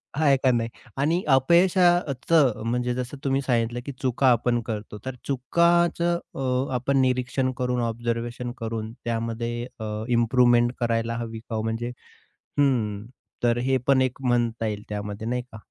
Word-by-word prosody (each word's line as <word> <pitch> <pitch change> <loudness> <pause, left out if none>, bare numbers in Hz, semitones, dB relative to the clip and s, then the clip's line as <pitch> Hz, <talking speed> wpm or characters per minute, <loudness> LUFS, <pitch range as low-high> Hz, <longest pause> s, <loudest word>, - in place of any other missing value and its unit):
आहे 145 -2 +4
का 130 0 +3
नाही? 115 -1 0 0.3
आणि 160 +6 +1
अपयशा 175 +7 +5
अ, 145 - -5 0.2
...चं 145 -10 +4
म्हणजे 125 +1 0
जसं 125 +3 -4
तुम्ही 135 0 +1
सांगितलं 120 -2 0
की 140 - -4
चुका 130 0 0
आपण 120 0 +2
करतो. 105 -2 -5
तर 130 -1 -4
चुकाचं 170 +5 +2 0.2
अ, 130 0 -1
आपण 130 +3 +1
निरीक्षण 130 0 0
करून, 125 -1 0
ऑब्झर्वेशन 120 +1 -3
करून, 115 -2 -4
त्यामध्ये 115 +1 -2
अ, 110 0 -4
इम्प्रूव्हमेंट 120 0 +4
करायला 115 -1 0
हवी 115 -1 -5
का 115 0 -7
हो? 110 - -1
म्हणजे 115 +2 -2 0.7
हं. 110 -7 +1 0.4
तर 120 0 +3
हे 130 +2 +1
पण 135 -1 +5
एक 130 +1 -1
म्हणता 120 -3 0
येईल 105 -1 -4
त्यामध्ये 105 +1 -5
नाही 125 +1 -1
का. 110 - -9
120 Hz, 155 wpm, -25 LUFS, 115-135 Hz, 0.7 s, अपयशा